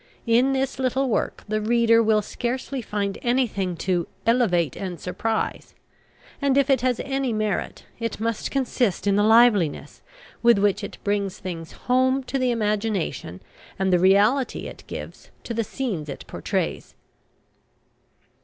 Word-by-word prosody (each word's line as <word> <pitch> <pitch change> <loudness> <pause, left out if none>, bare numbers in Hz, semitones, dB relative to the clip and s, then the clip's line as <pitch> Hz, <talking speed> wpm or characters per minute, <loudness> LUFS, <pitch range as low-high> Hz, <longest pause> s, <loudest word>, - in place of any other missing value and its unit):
In 245 +3 +3
this 265 -1 -1
little 265 +1 +1
work 225 - -1
the 215 0 -1
reader 230 +1 +4
will 215 -1 +3
scarcely 255 +4 -3
find 205 -3 -3
anything 220 -8 0
to 180 -3 0 0.2
"elevate 185 - +2
and 180 -3 -5
surprise;" 220 +4 -3 0.7
and, 280 -1 +2
if 280 0 +3
it 260 -3 +3
has 250 -2 +1
any 270 -2 -1
merit, 215 -2 -2
it 230 -3 -3
must 230 0 -2
consist 250 -7 0
in 200 -1 +3
the 205 - +3
liveliness 215 -7 +3 0.4
with 235 -1 +5
which 200 -1 +1
it - - -6
brings 200 -2 -1
things 170 -3 -7
home 260 +2 +2
to 270 +1 -2
the 255 -1 +1
imagination, 210 - -2 0.3
and 190 -1 +1
the 180 - +5
reality 205 +8 +3
it - - -9
gives - - -8
to 235 - -5
the 230 0 0
scenes 200 - -4
it 140 - -7
pourtrays. - - -3
225 Hz, 145 wpm, -24 LUFS, 195-250 Hz, 0.7 s, with